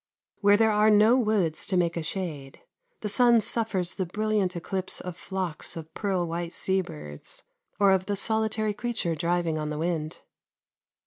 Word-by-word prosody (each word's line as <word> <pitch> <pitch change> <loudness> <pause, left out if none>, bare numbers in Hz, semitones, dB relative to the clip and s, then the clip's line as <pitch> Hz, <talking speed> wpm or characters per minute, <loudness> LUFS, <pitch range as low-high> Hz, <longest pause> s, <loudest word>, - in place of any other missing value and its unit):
Where 205 0 +5
there 220 0 +4
are 210 +1 +4
no 215 +3 +6
woods 210 -10 +1
to 190 - +1
make 170 -1 +1
a 170 - -2
shade, 155 -6 -4 0.4
the - - -2
sun 235 +2 +5
suffers 195 -5 -1
the 185 -2 -3
brilliant 210 -1 0
eclipse 185 +2 -4
of 180 -1 -6
flocks 185 -4 -4
of 160 0 -9
pearl 190 -4 -1
white 170 +1 -4
sea 190 0 0
birds, 75 - -10 0.4
or 200 -1 +5
of 190 -1 +1
the 205 - 0
solitary 220 0 0
creature 225 -6 -2
driving 170 0 0
on 150 0 -3
the 150 - -4
wind. 160 -1 -2
190 Hz, 170 wpm, -27 LUFS, 170-210 Hz, 0.4 s, no